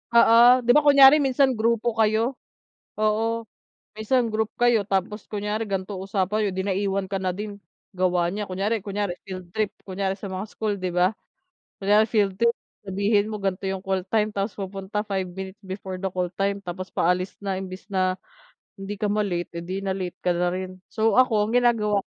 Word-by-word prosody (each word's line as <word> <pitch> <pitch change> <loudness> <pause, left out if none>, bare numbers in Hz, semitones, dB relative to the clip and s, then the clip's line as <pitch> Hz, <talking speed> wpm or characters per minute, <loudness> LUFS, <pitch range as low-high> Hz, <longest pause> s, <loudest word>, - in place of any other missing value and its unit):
Oo. 240 +2 +7
'Di 245 - +4
ba 300 - +7
kunyari 280 0 +8
minsan 270 -1 +3
grupo 230 +1 +1
kayo. 225 +4 +2 0.6
Oo, 225 +2 0 0.5
minsan 230 +3 +1
group 220 0 -1
kayo 240 -3 +4
tapos 195 +2 -2
kunyari 210 +1 -2
gan'to 195 -1 -3
usapan 200 +2 0
niyo - - -1
di 190 - -1
naiwan 195 0 -1
ka 195 - -4
na 185 -1 -1
din, 205 +2 -6 0.4
gawa 180 -1 +2
niya, 205 +4 -3
kunyari 200 +3 -2
kunyari 200 -3 -2
field 185 -2 -8
trip, 215 -2 0 0.2
kunyari 190 0 -2
sa 200 - -6
mga 190 +1 -4
school 215 -2 -2
'di 185 -2 -3
ba. 180 +4 +2 0.6
Kunyari 210 +2 +3
field 205 -4 +2
trip 235 0 +4 0.3
sabihin 205 +2 +1
mo 215 - -4
gan'to 195 -1 -2
'yung 190 0 -4
call 190 -1 0
time 215 -1 +1
tapos 200 +1 -3
pupunta 195 +1 -4
5 190 -3 -2
minutes 190 +2 -8
before 190 -1 -7
the 190 - -1
call 180 -1 -2
time 200 +2 0
tapos 185 +1 -6
paalis 180 +2 0
na 200 -1 -3
imbes 185 0 -6
na 185 0 +1 0.6
hindi 195 +1 -6
ka 210 - +1
ma-late, 180 -5 -2
eh, - - -9
di 185 +3 -4
na-late 190 -2 -3
ka 180 - +3
na 175 +1 +1
rin. 185 0 -5
So 220 -1 +1
ako, 225 -5 +4
ang 225 - -3
ginagawa 215 -4 +2
200 Hz, 185 wpm, -24 LUFS, 190-215 Hz, 0.6 s, kunyari